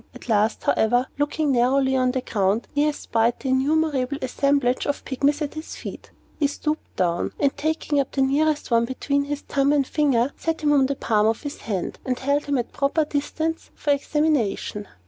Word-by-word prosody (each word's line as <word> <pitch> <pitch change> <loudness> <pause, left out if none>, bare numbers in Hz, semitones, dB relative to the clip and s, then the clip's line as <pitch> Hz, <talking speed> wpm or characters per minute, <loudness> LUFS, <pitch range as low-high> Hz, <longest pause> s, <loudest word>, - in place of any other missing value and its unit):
At - - -12
last, 215 -1 +1
however, 245 +3 +2
looking 295 0 +1
narrowly 265 +2 +3
on 255 -1 +2
the 255 0 -1
ground, 205 -1 0
he 290 +1 +2
espied 235 -5 0
the 265 - -4
innumerable 280 0 +1
assemblage 270 -1 +1
of 285 - -2
Pygmies 285 +3 +1
at 290 - -4
his 310 +1 -7
feet. - - -8 0.3
He 290 - +3
stooped 305 +2 -4
down, 175 -1 0
and 280 -1 +2
taking 310 -1 -1
up 275 - -1
the 270 - +1
nearest 290 +1 +1
one 230 0 +4
between 280 +3 -1
his 290 0 -4
thumb 280 0 +1
and 285 -2 +3
finger, 275 -3 +1
set 325 0 -2
him 295 -1 +3
on 270 -2 +4
the 280 - -1
palm 215 -4 +2
of 225 0 0
his 290 0 -5
left - - -16
hand, 195 -5 -3
and 255 -1 -1
held 280 +3 0
him 285 -1 0
at 240 - 0
a - - -30
proper 285 +3 0
distance 315 +3 -3
for 290 - 0
examination. 280 -8 0
275 Hz, 200 wpm, -23 LUFS, 245-295 Hz, 0.3 s, one